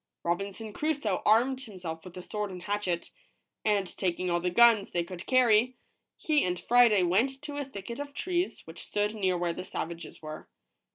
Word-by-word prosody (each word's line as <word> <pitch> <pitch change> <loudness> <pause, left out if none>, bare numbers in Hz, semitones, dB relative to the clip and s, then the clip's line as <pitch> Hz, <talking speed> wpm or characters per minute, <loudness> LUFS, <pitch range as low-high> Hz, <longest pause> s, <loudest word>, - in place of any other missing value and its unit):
Robinson 200 +5 -3
Crusoe 285 -11 -1
armed 250 +5 +4
himself 180 -9 -7
with 185 -1 -11
a 180 - -7
sword 210 +1 -3
and 180 -1 -8
a - - -11
hatchet, 195 -4 -2 0.5
and 205 -2 +2
taking 180 -1 -1
all 175 - +2
the 180 +1 0
guns 225 +1 +5
they 175 - 0
could 180 +1 -9
carry, 250 -1 +4 0.4
he 305 -2 +2
and 180 -1 -1
Friday 235 -5 +5
went 230 +10 +2
to 290 -1 -5
a 290 - -1
thicket 235 -1 -7
of 285 0 -5
trees 355 +4 -2
which 165 +1 -9
stood 210 +1 -1
near 190 -4 0
where 175 -1 -1
the - - -6
savages 170 -2 -6
were. 155 0 -8
205 Hz, 185 wpm, -29 LUFS, 180-245 Hz, 0.5 s, guns